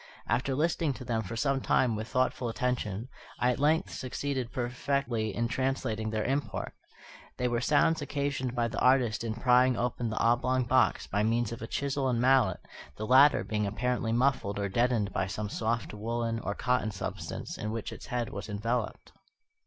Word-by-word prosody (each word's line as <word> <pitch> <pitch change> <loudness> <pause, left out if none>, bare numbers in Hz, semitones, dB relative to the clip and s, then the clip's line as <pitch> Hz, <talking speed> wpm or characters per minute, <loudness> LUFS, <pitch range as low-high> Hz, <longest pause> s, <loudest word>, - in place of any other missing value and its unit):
After 130 +4 0
listening 160 0 +1
to 125 0 -9
them 115 -2 0
for 110 +2 -6
some 135 +3 +1
time 125 -3 +2
with 110 +1 -4
thoughtful 130 -1 0
attention, 115 -3 -2 0.3
I 125 - +2
at 125 - -3
length 155 +5 +2
succeeded 130 -1 -3
perfectly 125 -3 -1
in 115 +1 0
translating 115 -3 -1
their 110 0 -1
import. 140 +3 -2 0.6
They 125 - 0
were 120 -1 0
sounds 155 +5 +3
occasioned 140 -3 -2
by 120 -1 +1
the 115 - -4
artist 125 -4 +3
in 110 -1 -2
prying 125 +1 +4
open 120 -1 -1
the 110 - -4
oblong 125 +2 +2
box 130 +2 +2
by 100 - -1
means 115 +1 +1
of 115 - -6
a 115 - -5
chisel 140 0 -1
and 120 -2 +1
mallet, 125 -6 +3 0.3
the 110 - -4
latter 135 +5 +6
being 105 -1 -1
apparently 120 +2 -1
muffled 120 -4 +1
or 100 -1 -1
deadened 115 -1 +1
by 95 - 0
some 105 +2 -4
soft 115 +1 -2
woollen 115 +2 -2
or 100 -2 -3
cotton 125 -4 +1
substance 95 -2 -5
in 105 - -3
which 110 0 -4
its - - -10
head 120 -2 -2
was 100 +2 -7
enveloped. 115 +3 -2
120 Hz, 180 wpm, -29 LUFS, 110-130 Hz, 0.6 s, latter